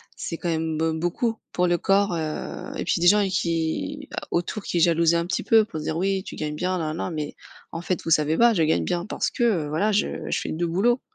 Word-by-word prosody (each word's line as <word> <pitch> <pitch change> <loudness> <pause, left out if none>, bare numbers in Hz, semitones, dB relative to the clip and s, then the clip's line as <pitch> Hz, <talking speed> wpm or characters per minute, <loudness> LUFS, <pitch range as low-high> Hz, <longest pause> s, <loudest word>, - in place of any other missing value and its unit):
c'est 165 - -5
quand 175 - -3
même 160 -1 -1
b 160 0 0
beaucoup 220 +7 0 0.2
pour 180 0 +1
le 175 0 +2
corps, 195 0 +2
heu 155 -2 -4
et - - -3
puis - - 0
des 175 - +4
gens 205 +1 +5
qui 165 - -2 0.2
autour 175 +4 -2
qui 175 - -1
jalousaient 170 0 +4
un 170 - -1
petit 180 - -2
peu 220 -1 +5
pour 160 - -6
dire: 160 +1 -2
«Oui, 190 +1 0
tu - - -8
gagnes 150 -1 -3
bien 185 +3 -1
nanana». 160 +2 -3
Mais 150 -2 -4 0.4
en 165 - -4
fait 175 +1 -2
vous 165 - -3
savez 155 +1 +3
pas, 235 0 +6
je 165 -5 +2
gagne 155 - +2
bien 175 0 -1
parce - - -1
que, 240 - -2
heu, 180 -11 +2
voilà 195 +9 +1
je 210 - +2 0.2
je - - 0
fais - - -4
2 170 +2 -1
boulots. 230 +9 +2
170 Hz, 240 wpm, -24 LUFS, 160-195 Hz, 0.4 s, pas